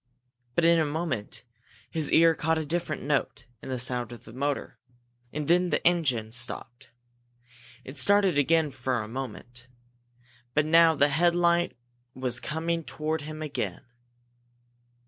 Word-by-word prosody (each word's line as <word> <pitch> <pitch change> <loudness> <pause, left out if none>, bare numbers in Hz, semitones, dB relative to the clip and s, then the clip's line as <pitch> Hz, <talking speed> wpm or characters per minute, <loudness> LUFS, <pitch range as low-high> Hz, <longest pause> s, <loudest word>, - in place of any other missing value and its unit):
But 170 - +3
in 170 0 +5
a 160 - +2
moment 145 -10 -3 0.5
his 155 -3 -1
ear 165 0 +6
caught 160 +1 0
a 160 - -2
different 160 -1 -3
note 140 -2 -1 0.2
in - - -9
the 130 - -2
sound 125 -1 0
of 120 - -10
the 110 - -13
motor, 140 +2 -3 0.5
and 150 -1 -4
then 180 +1 +3
the - - -1
engine 130 -11 +2
stopped. 120 0 -4 0.9
It 135 +3 -9
started 195 +4 +3
again 150 0 +2
in 120 - -15
a 110 -3 -2
moment, 120 0 -7 0.9
but 150 0 +3
now 165 +1 +6
the 145 0 +4
headlight 170 +1 +2 0.4
was 130 -1 -1
coming 165 +3 -2
toward 155 0 -3
him 155 +1 -7
again! 150 -2 -4
150 Hz, 145 wpm, -27 LUFS, 130-165 Hz, 0.9 s, ear